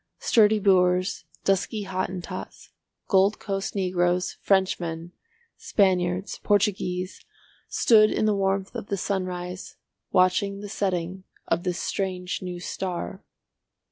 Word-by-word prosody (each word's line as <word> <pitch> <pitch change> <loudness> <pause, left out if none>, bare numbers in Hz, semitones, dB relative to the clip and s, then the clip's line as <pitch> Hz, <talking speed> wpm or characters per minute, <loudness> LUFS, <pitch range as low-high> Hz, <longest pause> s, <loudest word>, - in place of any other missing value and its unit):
Sturdy 220 -1 +4
Boers, 185 -2 +2 0.2
dusky 200 +2 0
Hottentots, 185 -1 -5 0.4
Gold 195 +1 +4
Coast 195 0 -3
Negroes, 180 -1 +1
Frenchmen, 175 -3 0 0.5
Spaniards, 185 -1 +1
Portuguese, 190 -3 0 0.4
stood 215 -2 +5
in - - 0
the 215 - +3
warmth 195 -1 0
of - - -6
the 200 - -2
sunrise 185 -1 -4 0.4
watching 195 +2 +2
the 205 - -7
setting 185 -1 -2 0.2
of - - +1
this 180 -1 -2
strange 185 -2 -2
new 180 -1 -5
star. 185 +2 -4
190 Hz, 110 wpm, -25 LUFS, 180-200 Hz, 0.5 s, stood